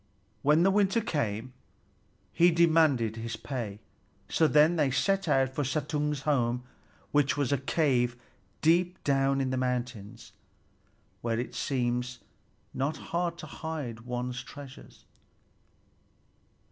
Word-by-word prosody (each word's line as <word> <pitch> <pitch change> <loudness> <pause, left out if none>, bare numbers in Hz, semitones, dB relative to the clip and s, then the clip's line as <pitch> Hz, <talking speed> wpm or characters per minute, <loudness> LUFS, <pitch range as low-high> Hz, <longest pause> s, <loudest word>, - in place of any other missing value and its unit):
When 150 +6 +4
the 195 - +4
winter 200 +2 +3
came, 130 - -2 0.8
he 175 +1 +5
demanded 160 -9 +3
his 115 0 -4
pay. 110 -6 -5 0.5
So 160 - +3
then 155 +3 +5
they 150 -4 +2
set 195 +8 +1
out 135 -3 +2
for 145 - -1
Suttung's 150 +1 -1
home, 125 -4 +1 0.5
which 145 -1 +2
was 145 -3 0
a 140 - +2
cave 125 -4 +1 0.5
deep 175 +3 +2
down 135 -1 +2
in 130 -1 0
the 130 - -1
mountains, 125 -4 -3 0.9
where 115 -1 -1
it 125 - -4
seems 125 -1 -1 0.6
not 140 +4 -1 0.2
hard 170 0 0
to 155 - -8
hide 150 -7 -5
one's 125 +1 -4
treasures. 140 -1 -12
135 Hz, 120 wpm, -29 LUFS, 125-155 Hz, 0.9 s, he